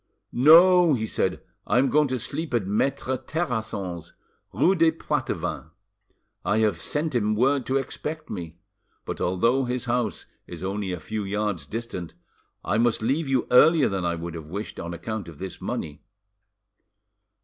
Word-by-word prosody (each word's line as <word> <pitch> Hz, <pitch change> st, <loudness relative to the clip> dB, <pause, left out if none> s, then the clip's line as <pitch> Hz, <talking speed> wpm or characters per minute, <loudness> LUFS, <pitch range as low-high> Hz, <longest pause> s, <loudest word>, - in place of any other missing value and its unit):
"No;" 170 Hz, +4 st, +7 dB
he 110 Hz, -2 st, -2 dB
said, -, -, -1 dB, 0.2 s
"I -, -, +2 dB
am 135 Hz, +2 st, +3 dB
going 150 Hz, 0 st, +4 dB
to 130 Hz, -1 st, -1 dB
sleep 145 Hz, +4 st, -3 dB
at 110 Hz, -5 st, 0 dB
Maitre 130 Hz, +5 st, 0 dB
Terrasson's, 110 Hz, -, -4 dB, 0.4 s
rue 185 Hz, -, +3 dB
des 165 Hz, -3 st, +4 dB
Poitevins; 165 Hz, -, -3 dB, 0.7 s
I 105 Hz, -, +1 dB
have 110 Hz, -2 st, +1 dB
sent 150 Hz, 0 st, -1 dB
him 110 Hz, -3 st, +1 dB
word 130 Hz, +3 st, +2 dB
to 135 Hz, -, +2 dB
expect 155 Hz, +3 st, -5 dB
me. 85 Hz, -1 st, -7 dB, 0.5 s
But -, -, -5 dB
although 115 Hz, +9 st, +2 dB
his 125 Hz, 0 st, -2 dB
house 120 Hz, -1 st, -1 dB, 0.2 s
is 85 Hz, 0 st, -8 dB
only 100 Hz, 0 st, -2 dB
a 90 Hz, -, -4 dB
few 110 Hz, +7 st, -4 dB
yards 100 Hz, -6 st, -2 dB
distant, 110 Hz, -6 st, -6 dB, 0.5 s
I 105 Hz, +3 st, +1 dB
must 120 Hz, -2 st, +2 dB
leave 140 Hz, +6 st, 0 dB
you 135 Hz, -2 st, +1 dB
earlier 155 Hz, +4 st, +6 dB
than 95 Hz, -2 st, -2 dB
I 85 Hz, -1 st, -1 dB
could 85 Hz, 0 st, -6 dB
have 80 Hz, -2 st, -8 dB
wished, 100 Hz, +5 st, -6 dB
on 85 Hz, +1 st, -5 dB
account 110 Hz, +4 st, -5 dB
of 80 Hz, -, -12 dB
this 95 Hz, +1 st, -7 dB
money." 75 Hz, -1 st, -4 dB
110 Hz, 160 wpm, -25 LUFS, 95-135 Hz, 0.7 s, No